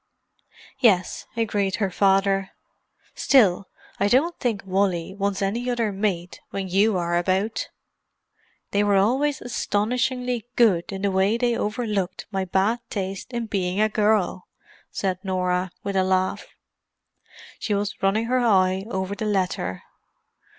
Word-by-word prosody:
"Yes," 200 -9 +2
agreed 205 -4 0
her 200 -4 -1
father. 195 0 +2 0.6
"Still, 200 -8 +3 0.3
I 200 - +3
don't 290 +10 +3
think 230 -5 -1
Wally 190 -2 0
wants 200 0 -1
any 235 +6 -1
other 235 -3 0
mate 190 -3 -2
when 195 -1 -4
you 195 +2 +3
are 175 -1 -1
about." 190 +5 -1 1.0
"They 205 0 +2
were 205 -1 +3
always 265 +9 +2
astonishingly 245 +2 -1
good 200 -8 +3
in 195 0 -5
the 200 - +2
way 190 +4 +2
they 240 -1 +1
overlooked 210 -4 -2
my 190 -1 -1
bad 195 +6 +1
taste 195 +1 -4
in 235 -1 -2
being 190 -3 -1
a 215 0 +3
girl!" 210 -3 +1 0.4
said 185 -2 -2
Norah, 185 -1 0
with 200 -1 -3
a 190 - +3
laugh. 185 0 0 1.1
She 210 - -1
was 205 0 -3
running 200 +4 +2
her 255 +2 +1
eye 190 -5 +2
over 190 -2 -2
the 215 +2 -4
letter. 185 - -1
200 Hz, 135 wpm, -24 LUFS, 190-225 Hz, 1.1 s, Still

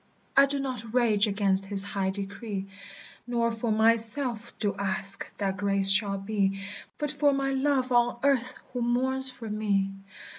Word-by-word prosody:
"I 275 0 +6
do 280 +1 -3
not 250 -4 -5
rage 220 -4 +3
against 195 -1 0
his 195 -1 +1
high 200 -1 -2
decree, 195 +1 -5 0.6
Nor 235 -1 0
for 225 0 -3
myself 230 +2 +2
do 205 -2 -1
ask 200 0 -1
that 195 -1 -2
grace 195 -1 +5
shall 195 0 +4
be; 195 -1 -1 0.4
But 295 -2 -3
for 290 -1 +2
my 275 0 -1
love 270 -1 0
on 240 0 +2
earth 255 -3 +1 0.2
who 250 - -3
mourns 260 +2 0
for 240 -3 -9
me. 205 -2 0
220 Hz, 155 wpm, -27 LUFS, 200-255 Hz, 0.6 s, I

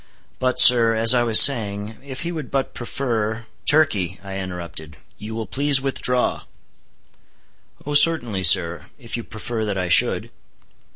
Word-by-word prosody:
But, 130 0 -2
sir, 115 -2 +6
as 115 +2 +4
I 125 - +1
was 115 -2 +5
saying, 105 -5 +2
if 135 -2 -8
he 170 - -5
would 155 -5 -8
but 135 -1 -4
prefer—" 115 -3 -5 0.2
"Turkey," 105 - 0
interrupted 90 -5 -9
I, - - -23 0.2
"you 110 +1 -9
will 115 -1 -6
please 140 +6 +1
withdraw." 125 -2 -3 1.4
"Oh 145 - -5
certainly, 145 - +2
sir, 85 -1 +3
if 120 -4 -9
you 120 - -6
prefer 110 +1 -7
that 105 -2 -4
I 90 -1 -4
should." - - +2
115 Hz, 150 wpm, -19 LUFS, 100-130 Hz, 1.4 s, sir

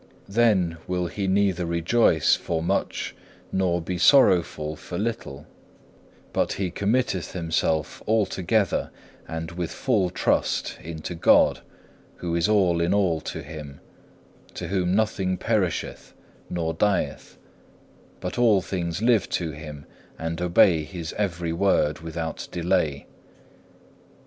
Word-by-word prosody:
Then 100 -6 +2
will 90 -1 -1
he 95 +3 -3
neither 95 -2 +2
rejoice 85 +1 +3
for 80 -1 -3
much - - -1 0.4
nor 90 -2 +1
be 90 +1 -4
sorrowful 85 - +4
for 85 - -7
little, 90 -10 -4 0.9
but - - +1
he 95 -3 -2
committeth 100 -2 0
himself 80 -3 -1
altogether 105 -2 +1 0.4
and 80 0 -5
with 85 -1 -3
full 105 -9 +1
trust - - 0
unto 80 +1 -6
God, 80 - +4 0.6
who 85 -1 -4
is 85 +3 +1
all 90 -5 +3
in 85 +4 +2
all 90 -6 +1
to 80 - -6
him, 75 -2 -9 0.8
to 85 - -5
whom 90 -1 +1
nothing 95 -4 0
perisheth 100 -4 -2 0.3
nor 80 -2 -2
dieth, 100 +4 -1 0.8
but 90 +6 -4
all 110 -5 +5
things 90 0 -3
live 115 -5 +3
to 85 -3 -2
Him 75 -1 -9 0.3
and 80 +1 -4
obey 85 -2 +4
His 85 +1 -6
every 85 -5 -2
word 85 -4 +2
without 80 0 -5
delay. 85 -5 0
90 Hz, 120 wpm, -25 LUFS, 80-100 Hz, 0.9 s, all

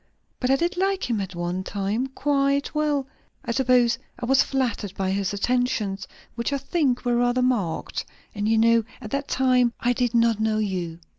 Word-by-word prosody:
But 250 - 0
I 270 - +5
did 340 +5 -1
like 385 +1 0
him 220 -3 0
at 190 -2 -6
one 175 +2 -2
time, 205 +6 -2
quite 280 +1 0
well. 300 -3 0 0.4
I - - -1
suppose 245 -2 +3 0.2
I 245 - -4
was 265 +2 +4
flattered 230 -7 -1
by 190 -1 -1
his 195 -1 -1
attentions, 210 -2 -1 0.3
which 235 +3 -2
I 280 - +1
think 275 -2 0
were 240 -1 +2
rather 245 +1 +2
marked. 205 -11 -1 0.3
And 205 +1 -1
you 225 - +3
know, 230 0 +4 0.2
at 215 - -9
that 275 0 -2
time 250 -2 +2
I 245 +1 +2
did 245 -1 0
not 230 -2 +3
know 220 0 +1
you." 185 -6 -2
240 Hz, 190 wpm, -24 LUFS, 205-265 Hz, 0.4 s, I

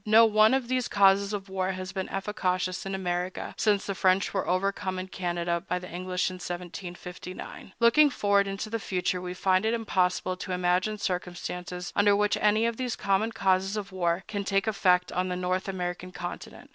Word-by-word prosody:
No 220 +2 +7
one 215 +2 +5
of 265 -3 -1
these 255 -1 0
causes 200 0 +4
of 200 -1 -4
war 190 0 -1
has 185 0 -6
been 190 -1 -4
efficacious 185 -2 -2
in 195 - -2
America 180 -1 -3
since 205 -2 +2
the 200 - -2
French 190 +1 +2
were 195 - -1
overcome 185 0 0
in 185 +1 -5
Canada 175 -2 -2
by 180 - 0
the 180 0 -7
English 180 +1 -2
in 185 - -7
1759. 180 +1 -7
Looking 250 +6 +6
forward 200 -5 +2
into 195 +2 -4
the 230 - -1
future, 180 -2 -1
we 180 0 -5
find 185 +1 +2
it 220 +1 +1
impossible 185 -4 0
to 185 - -5
imagine 180 +4 +1
circumstances 180 -1 -4
under 205 0 +5
which 210 0 +2
any 215 +2 +3
of 230 -1 -1
these 250 -2 -2
common 200 +3 +1
causes 195 -1 +1
of 200 -2 -5
war 175 -1 0
can 200 -2 -3
take 195 0 +1
effect 185 -4 +2
on 180 +1 -1
the 180 - -2
North 185 +1 -1
American 180 -1 -4
continent. 175 -1 -8
190 Hz, 190 wpm, -28 LUFS, 180-205 Hz, -, No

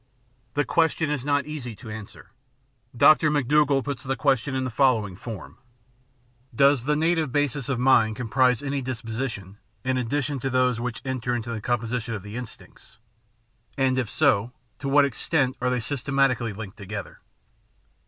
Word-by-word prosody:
The 145 0 +1
question 160 -2 +1
is 145 -4 -2
not 145 0 +1
easy 140 -7 -6
to 110 +2 -10
answer. 105 -2 -10 0.7
Dr. 155 +4 +6
McDougall 145 -1 +2
puts 140 -2 -4
the 135 0 -1
question 135 -2 +1
in 130 - 0
the 130 - -3
following 115 -7 +2
form: 105 -1 -9 1.0
Does 140 -1 +4
the 150 +1 +2
native 160 -2 +1
basis 140 -2 0
of 135 - 0
mind 115 -4 +4
comprise 125 +2 +2
any 140 0 -2
disposi 125 0 -3
tion, 100 -2 -10 0.2
in 130 0 0
addition 140 +3 -1
to 135 - -2
those 125 -2 +2
which 120 -1 -4
enter 125 -2 -2
into 120 0 -4
the 110 -2 -4
composition 120 0 -2
of 100 - -7
the 105 +2 -8
instincts; 125 -2 -10 0.8
and 130 -1 +2
if 120 -5 -2
so, 115 +5 +2 0.3
to 140 - -3
what 145 +1 +5
extent 135 0 0
are 125 - +1
they 125 0 0
systematically 135 -2 0
linked 100 -1 -8
together? 100 0 -7
130 Hz, 165 wpm, -25 LUFS, 115-140 Hz, 1.0 s, Dr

